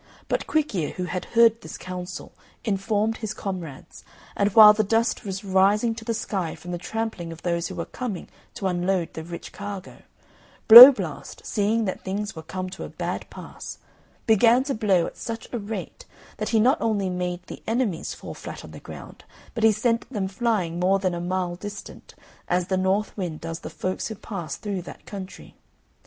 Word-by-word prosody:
But -, -, -1 dB
Quick 310 Hz, -4 st, 0 dB
ear, 165 Hz, -6 st, -1 dB
who 185 Hz, -, -4 dB
had 180 Hz, 0 st, -4 dB
heard 230 Hz, -1 st, +4 dB
this -, -, -8 dB
counsel, 180 Hz, 0 st, -7 dB, 0.3 s
informed 210 Hz, +1 st, 0 dB
his 220 Hz, -2 st, -5 dB
comrades; 175 Hz, -8 st, -7 dB, 0.3 s
and 200 Hz, -, +2 dB
while 215 Hz, -1 st, +10 dB
the 215 Hz, +1 st, +1 dB
dust 225 Hz, +4 st, +1 dB
was 195 Hz, -2 st, -5 dB
rising 200 Hz, +4 st, +3 dB
to 225 Hz, 0 st, -9 dB
the 230 Hz, 0 st, -2 dB
sky 190 Hz, -6 st, -3 dB
from 175 Hz, -, -9 dB
the 175 Hz, -, -3 dB
trampling 205 Hz, -2 st, -4 dB
of 165 Hz, -, -11 dB
those 170 Hz, -1 st, -1 dB
who 185 Hz, -, -8 dB
were 170 Hz, -, -3 dB
coming 235 Hz, -8 st, -5 dB, 0.3 s
to 195 Hz, -, -5 dB
unload 180 Hz, -1 st, 0 dB
the 160 Hz, -, -6 dB
rich 170 Hz, +1 st, -8 dB
cargo, 200 Hz, -2 st, -7 dB, 0.7 s
Blow 240 Hz, +5 st, +14 dB
blast, 260 Hz, -, -7 dB
seeing 220 Hz, +2 st, +1 dB
that 190 Hz, -, -4 dB
things 205 Hz, +2 st, -3 dB
were 160 Hz, -, -7 dB
come 185 Hz, +3 st, -5 dB
to -, -, -7 dB
a -, -, -7 dB
bad -, -, -5 dB
pass, -, -, -9 dB, 0.5 s
began 230 Hz, +3 st, +5 dB
to 275 Hz, 0 st, -2 dB
blow 195 Hz, -7 st, +2 dB
at -, -, -8 dB
such 230 Hz, -1 st, -6 dB
a 240 Hz, -, -1 dB
rate 215 Hz, -, -6 dB, 0.3 s
that -, -, -3 dB
he 225 Hz, -, +3 dB
not 255 Hz, +8 st, +3 dB
only 210 Hz, -4 st, 0 dB
made 180 Hz, 0 st, -3 dB
the -, -, -9 dB
enemies 225 Hz, -7 st, -1 dB
fall -, -, -8 dB
flat -, -, -8 dB
on -, -, -12 dB
the -, -, -10 dB
ground, -, -, -11 dB, 0.3 s
but 230 Hz, -, -3 dB
he 220 Hz, -, +7 dB
sent 230 Hz, +3 st, 0 dB
them 205 Hz, -6 st, -2 dB
flying 190 Hz, -5 st, -1 dB
more 190 Hz, +2 st, +3 dB
than 185 Hz, -2 st, -1 dB
a 170 Hz, -, -3 dB
mile 180 Hz, 0 st, -2 dB
distant, 205 Hz, +3 st, -9 dB, 0.3 s
as 180 Hz, 0 st, 0 dB
the 190 Hz, -, +2 dB
north 190 Hz, +3 st, 0 dB
wind 175 Hz, -6 st, -4 dB
does 165 Hz, 0 st, -5 dB
the -, -, -8 dB
folks 185 Hz, 0 st, -3 dB
who 220 Hz, -, -6 dB
pass 185 Hz, -8 st, -6 dB
through 200 Hz, -3 st, -4 dB
that 175 Hz, -, -12 dB
country. 195 Hz, -2 st, -9 dB
195 Hz, 195 wpm, -24 LUFS, 180-225 Hz, 0.7 s, Blow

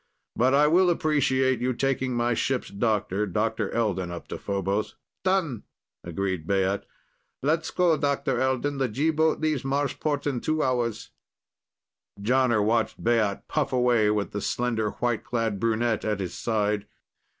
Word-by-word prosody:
But 130 Hz, +3 st, +3 dB
I 145 Hz, +1 st, +5 dB
will 175 Hz, +4 st, +4 dB
appreciate 135 Hz, -6 st, +2 dB
your 130 Hz, +1 st, +1 dB
taking 130 Hz, 0 st, -1 dB
my 120 Hz, 0 st, +1 dB
ship's 130 Hz, +2 st, -1 dB
doctor, 105 Hz, -1 st, 0 dB
Dr. 110 Hz, +2 st, -1 dB
Elden, 100 Hz, -6 st, -1 dB
up 85 Hz, -1 st, -7 dB
to -, -, -5 dB
Phobos." 100 Hz, +1 st, -2 dB, 0.3 s
"Done!" 185 Hz, -, +1 dB, 0.4 s
agreed 90 Hz, -1 st, -3 dB
Baat. 95 Hz, 0 st, +1 dB, 0.6 s
"Let's 160 Hz, +3 st, +1 dB
go, 175 Hz, -3 st, +3 dB
Dr. 140 Hz, -3 st, 0 dB
Elden. 130 Hz, +2 st, 0 dB
The 135 Hz, -, +2 dB
G 140 Hz, +8 st, +1 dB
boat 160 Hz, 0 st, +2 dB
leaves 155 Hz, -4 st, +1 dB
Marsport 140 Hz, +1 st, -1 dB
in 135 Hz, -5 st, -1 dB
two 155 Hz, 0 st, 0 dB
hours." 120 Hz, -4 st, -1 dB, 1.1 s
Jonner 120 Hz, -1 st, +2 dB
watched 115 Hz, +1 st, 0 dB
Baat 110 Hz, -4 st, +1 dB
puff -, -, -1 dB
away, 125 Hz, -4 st, +3 dB
with 105 Hz, -1 st, 0 dB
the 105 Hz, -, -3 dB
slender, 115 Hz, -2 st, -1 dB
white 120 Hz, 0 st, -1 dB
clad 115 Hz, -5 st, -1 dB
brunette 115 Hz, 0 st, 0 dB
at 105 Hz, -2 st, -1 dB
his 95 Hz, -3 st, -4 dB
side. 105 Hz, -2 st, -1 dB
120 Hz, 150 wpm, -26 LUFS, 105-135 Hz, 1.1 s, I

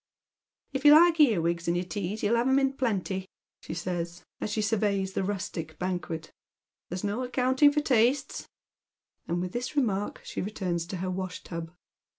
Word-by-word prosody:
"If 270 Hz, -, -2 dB
you 295 Hz, 0 st, +9 dB
like 335 Hz, +1 st, +6 dB
earwigs 170 Hz, -, +3 dB
in 170 Hz, -, +2 dB
your 175 Hz, -, 0 dB
teas 205 Hz, +2 st, -4 dB
you'll 215 Hz, +3 st, +3 dB
have 235 Hz, +2 st, +2 dB
'em 265 Hz, +1 st, +4 dB
in 270 Hz, 0 st, +2 dB
plenty," 195 Hz, -7 st, -1 dB, 0.3 s
she -, -, -6 dB
says, 175 Hz, 0 st, -4 dB, 0.2 s
as -, -, -3 dB
she 210 Hz, -, -1 dB
surveys 205 Hz, -3 st, 0 dB
the -, -, 0 dB
rustic 185 Hz, -5 st, -4 dB
banquet. 175 Hz, -3 st, -3 dB, 0.6 s
"There's 180 Hz, +3 st, -4 dB
no 205 Hz, +4 st, -1 dB
accounting 260 Hz, +3 st, +3 dB
for 300 Hz, +1 st, +1 dB
tastes; 255 Hz, 0 st, +1 dB, 0.4 s
" -, -, -51 dB
and 170 Hz, +1 st, -1 dB
with 180 Hz, 0 st, -3 dB
this 245 Hz, +6 st, -4 dB
remark 210 Hz, -8 st, 0 dB
she -, -, -4 dB
returns 180 Hz, -4 st, -2 dB
to 185 Hz, -, -4 dB
her 185 Hz, -, -1 dB
wash 185 Hz, 0 st, -4 dB
tub. 165 Hz, -1 st, -6 dB
200 Hz, 175 wpm, -28 LUFS, 180-250 Hz, 0.6 s, you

